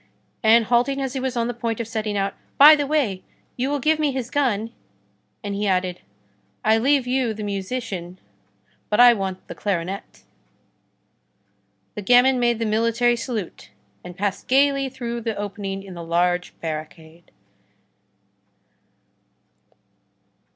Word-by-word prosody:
And 225 0 +5
halting 250 +4 +1
as 265 -2 -3
he 270 - -2
was 255 -1 -3
on 230 0 0
the 245 - -3
point 230 -1 -3
of 230 - -3
setting 215 -2 -3
out:— 195 0 -1 0.2
"By 300 +2 +10
the 290 -2 -2
way, 265 -11 0 0.3
you 255 +2 -1
will 290 - 0
give 310 +3 +1
me 300 -2 +1
his 255 -2 -4
gun!" 230 -6 0 0.7
and 205 -1 -4
he 205 +1 -1
added: 185 -1 -1 0.6
"I 220 +1 +4
leave 270 +2 +2
you 250 -3 0
the 215 - -6
musician, 195 -3 -4 0.7
but 210 - +1
I 245 0 +9
want 190 -3 -5
the - - -7
clarinet." 190 -1 -4 1.7
The - - -6
gamin 250 +4 +4
made 240 -1 +2
the 230 - -2
military 230 +2 +2
salute 230 -5 -5 0.3
and 180 0 -10
passed 200 0 -3
gayly 275 0 +3
through 235 -2 -5
the 225 -1 -3
opening 200 -1 -5
in 195 -2 -10
the 170 -1 -8
large 175 +2 0
barricade. 160 +1 -7
225 Hz, 145 wpm, -22 LUFS, 195-255 Hz, 1.7 s, By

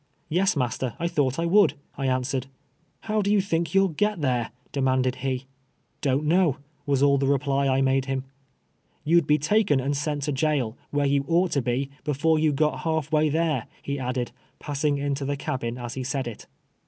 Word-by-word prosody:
" - - -41
Yes, 185 +4 +2
master, 125 -2 -1
I 170 0 -1
thought 135 -5 0
I 165 - 0
would," 200 +4 +4 0.2
I 135 - -2
answered. 130 +1 -1 0.3
" 165 - -42
How 215 0 +1
do 200 0 0
you 210 - +4
think 170 -3 -1
you'll 195 0 +5
get 210 +4 0
there? 125 -5 0
" - - -36
demanded 130 -2 +1
he. 135 0 -1
'• 130 - -13 0.6
Don't 140 +2 +1
know," 165 -3 +3 0.3
was 140 -1 +2
all 140 -1 +4
the, 135 - +1
reply 140 0 +1
I 135 0 +2
made 135 0 +2
him. 135 -1 -2 0.4
" - - -42
You'd 170 +2 +4
be 150 - +4
taken 185 0 +2
and 140 +2 -1
sent 145 0 -2
to 150 - -1
jail, 135 -5 0
where 145 0 0
you 140 0 +2
ought 175 +1 +2
to 140 - +1
be, 130 +3 -1
before 155 +2 +2
you 155 -1 +3
got 150 +2 +1
half 160 -2 -1
way 155 0 +3
tliere,'' 155 -5 0 0.2
he 140 0 -3
added, 125 -1 -2 0.3
pass 145 -1 -5
ing 145 -2 +2
into 140 0 -2
the 140 +1 -2
cabin 125 -3 -3
as 120 -1 -6
he 130 - -4
said 130 0 -2
it. 115 -3 -8
140 Hz, 215 wpm, -25 LUFS, 130-160 Hz, 0.6 s, you'll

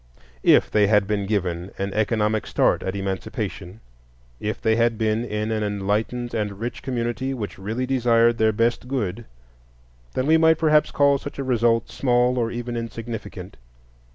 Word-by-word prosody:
If - - +4
they 105 -1 +4
had 105 -1 +4
been 100 -1 -2
given 90 -4 -2
an 100 0 -3
economic 110 0 0
start - - +2
at 95 +1 -3
Emancipation, 95 0 -5 0.6
if 105 +2 -3
they 110 0 +2
had 115 0 +2
been 110 +1 0
in 105 -1 -3
an 110 -1 -1
enlightened 105 +4 -2
and 105 -3 -3
rich 120 +2 -5
community 125 +1 -2
which 105 -6 -6
really 110 +6 -3
desired 120 -3 +3
their 110 0 +4
best 115 +3 0
good, 120 -4 -3 0.9
then 130 - 0
we 160 +2 +5
might 160 0 +4
perhaps 155 -1 +3
call 140 -1 +3
such 145 - -8
a 140 - -2
result 120 -2 +1
small 125 -1 +2
or 115 -1 0
even 120 +1 -5
insignificant. 115 -5 -6
115 Hz, 160 wpm, -23 LUFS, 105-120 Hz, 0.9 s, we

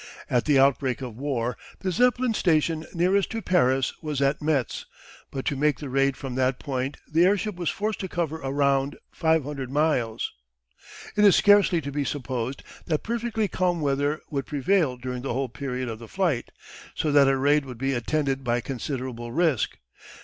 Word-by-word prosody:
At 125 -2 +2
the 145 -3 +4
outbreak 135 -1 +2
of 120 -4 -6
war 125 -2 -2 0.3
the 185 - -1
Zeppelin 245 +3 +2
station 160 -4 +1
nearest 185 +3 +2
to 225 - -2
Paris 135 -8 +2
was 150 -3 -3
at 140 +2 +1
Metz, 145 -6 -1 0.4
but 135 - -5
to 140 - 0
make 150 +2 +2
the 145 - -7
raid 135 0 +2
from 135 -3 -6
that 130 0 +1
point 135 0 -3
the 160 +2 +3
airship 205 +3 +2
was 175 -3 -1
forced 210 +3 -2
to 190 - -3
cover 160 -3 -3
a 135 - -3
round 140 0 +1
500 150 -5 0
miles. 130 -6 0 0.8
It 210 - +3
is 200 -3 +7
scarcely 205 -4 +5
to 140 -1 -5
be 145 +1 -1
supposed 130 -2 -3 0.2
that 155 -3 0
perfectly 230 -2 -1
calm 180 -2 0
weather 145 +1 0
would 140 -3 -2
prevail 150 -2 +1
during 125 0 -5
the 135 - -3
whole 135 +1 -1
period 130 0 -4
of 110 -1 -5
the 115 - -10
flight, 170 - -1 0.5
so 155 - 0
that 140 -1 +6
a 135 0 +3
raid 145 +2 +3
would 125 -3 -8
be 135 +3 0
attended 135 +2 -1
by 120 -1 +1
considerable 125 -2 -5
risk. 155 -4 +1
140 Hz, 180 wpm, -25 LUFS, 130-165 Hz, 0.8 s, is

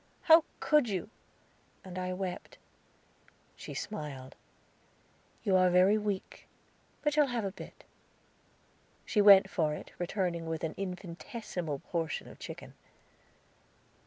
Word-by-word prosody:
"How 320 0 +8 0.2
could 300 -6 +3
you?" 195 +2 -3 0.7
And 185 -1 -7
I 185 0 -2
wept. 185 -1 -5 1.0
She - - -9
smiled. 145 -10 -6 1.1
"You 195 - +2
are 185 0 +5
very 180 +3 +5
weak, 210 -3 -4 0.6
but 295 -1 +2
shall 295 -1 +4
have 240 -4 -2
a 195 - -2
bit." - - -12 1.2
She 210 - +2
went 200 -1 +8
for 155 -5 0
it, - - -10
returning 175 -2 -2
with 160 -1 -3
an 160 - -2
infinitesimal 180 - -5
portion 165 -2 -2
of - - -13
chicken. - - -9
185 Hz, 120 wpm, -31 LUFS, 170-210 Hz, 1.2 s, How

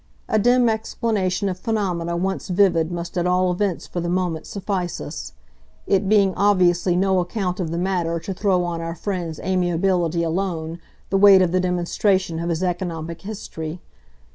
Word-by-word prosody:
A 215 - +2
dim 245 +2 +4
explanation 215 -3 -1
of 185 -1 -3
phenomena 180 -6 -1
once 190 +2 -2
vivid 175 -3 +2
must 175 +1 -4
at 175 - 0
all 180 0 +2
events 185 -1 -1
for 175 - -5
the 170 0 -2
moment 175 -3 -1
suffice 190 -3 -3
us; 60 0 -7 0.5
it 195 0 +1
being 200 -3 +4
obviously 180 -3 +3
no 190 0 +2
account 180 0 -2
of 175 -3 -2
the 170 - -3
matter 175 -2 0
to 190 +4 -4
throw 185 -2 +1
on 170 -1 -3
our 165 0 -4
friend's 175 -5 -4
amiability 175 -2 +1
alone 165 -1 -2 0.3
the 195 - +3
weight 195 -2 +8
of 175 - 0
the 185 - +2
demonstration 180 0 0
of 170 +1 -2
his 170 +1 -1
economic 170 -2 -3
history. 175 -5 -6
180 Hz, 165 wpm, -22 LUFS, 170-195 Hz, 0.5 s, weight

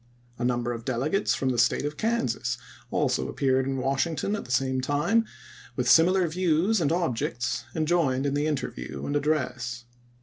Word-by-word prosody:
A - - -2
number 120 -1 0
of 115 -1 -7
delegates 135 - 0
from 135 - -1
the 125 -2 0
State 120 - +2
of 150 +1 -3
Kansas 130 - -1 0.3
also - - 0
appeared 130 -1 +1
in 135 0 -1
Wash 135 +3 +1
ington 165 +5 -2
at 210 - -5
the 125 - -8
same 130 0 +1
time 150 - +2 0.5
with 125 - -1
similar 175 +5 +5
views 180 +4 +1
and 150 -2 +1
objects, 120 -7 -1
and 155 -1 0
joined 145 -6 +2
in 140 - 0
the 145 +1 0
interview 140 -5 -4
and 145 - -2
address. 130 -5 -1
140 Hz, 175 wpm, -27 LUFS, 125-165 Hz, 0.5 s, similar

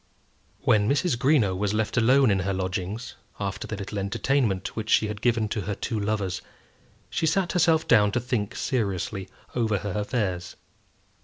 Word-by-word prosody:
When 105 0 +3
Mrs. 145 +1 +2
Greenow 120 -7 +3
was 105 +2 -1
left 110 0 -1
alone 125 +1 +5
in 95 - +2
her 95 +1 -1
lodgings, 95 +5 -3 0.3
after 100 -2 -3
the 110 - -4
little 100 0 -5
entertainment 110 0 0
which 110 -1 -4
she 110 - +4
had 105 -1 -6
given 115 -3 +2
to 105 - -2
her 100 +1 -3
two 115 +1 -3
lovers, 100 -3 -1 0.7
she 160 - 0
sat 175 +2 +1
herself 165 -3 +3
down 105 -3 +5
to - - +2
think 120 -4 -2
seriously 100 -5 -2 0.2
over 110 -4 +1
her 100 +1 -4
affairs. 100 -3 -2
105 Hz, 165 wpm, -26 LUFS, 100-120 Hz, 0.7 s, alone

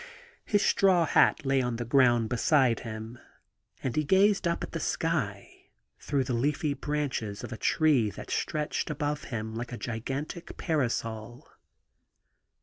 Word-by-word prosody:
His 205 -1 +2
straw 185 -4 +4
hat 155 0 +3
lay 135 0 +2
on 125 -2 -1
the 120 +1 -4
ground 120 -2 +4
beside 125 0 +3
him, 110 +1 -7 0.6
and 130 - -2
he 155 - +2
gazed 195 +4 +3
up 170 - -1
at - - -6
the 165 - -3
sky 135 -14 -2 0.3
through 140 -2 0
the 125 - -3
leafy 145 +4 0
branches 140 -8 -3
of - - -6
a - - -4
tree 145 -8 +3
that - - -9
stretched 150 0 -2
above 150 0 -2
him 110 -3 -4
like 120 +2 -5
a 120 - -5
gigantic 135 - -5
parasol. 120 -6 -2
135 Hz, 145 wpm, -28 LUFS, 115-155 Hz, 0.6 s, straw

